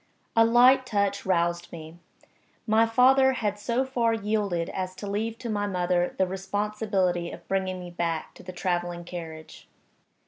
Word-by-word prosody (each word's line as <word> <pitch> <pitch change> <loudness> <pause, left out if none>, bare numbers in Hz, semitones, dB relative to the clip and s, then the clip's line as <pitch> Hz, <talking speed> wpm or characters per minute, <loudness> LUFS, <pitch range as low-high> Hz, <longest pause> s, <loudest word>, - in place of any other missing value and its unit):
A 225 - +6
light 250 +3 +6
touch 200 -3 -1
roused 175 -1 0
me. 160 0 -10 0.7
My 220 +1 +4
father 265 +3 +5
had 210 -5 -2
so 240 +5 0
far 235 -3 +1
yielded 205 -5 -1
as 185 -1 -4
to 205 - -8
leave 220 +3 -2
to 240 - -7
my 205 -2 -1
mother 180 -2 0
the 190 - +3
responsibility 195 -2 -1
of - - -11
bringing 190 -1 -1
me 175 -1 -8
back 170 -2 -3
to - - -14
the 185 - -8
traveling 175 -1 -2
carriage. 165 -2 -9
195 Hz, 160 wpm, -26 LUFS, 175-225 Hz, 0.7 s, A